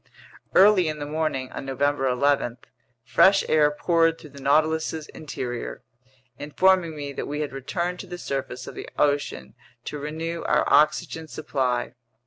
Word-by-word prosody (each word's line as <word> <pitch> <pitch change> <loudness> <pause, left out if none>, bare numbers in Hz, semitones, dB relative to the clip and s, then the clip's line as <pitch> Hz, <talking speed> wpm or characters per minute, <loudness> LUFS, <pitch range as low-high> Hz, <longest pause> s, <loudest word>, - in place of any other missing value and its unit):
Early 190 -3 +6
in 155 0 -2
the 145 - -5
morning 150 -4 -2
on - - -6
November 135 +1 0
11, 125 -1 +1 0.5
fresh 190 +10 +4
air 150 -1 +4
poured 165 +2 +2
through 155 -4 -13
the 140 0 -12
Nautilus's 155 +2 +1
interior, 125 -5 -6 0.6
informing 170 +2 +2
me 145 -1 -6
that - - -5
we 150 +1 -3
had 145 -2 -4
returned 170 +7 -3
to 195 - -8
the 175 0 -7
surface 135 -5 -4
of - - -8
the - - -8
ocean 145 -1 0 0.3
to 150 - -5
renew 160 +3 -4
our - - +2
oxygen 155 +1 +2
supply. 130 -6 -2
150 Hz, 150 wpm, -25 LUFS, 135-165 Hz, 0.6 s, Early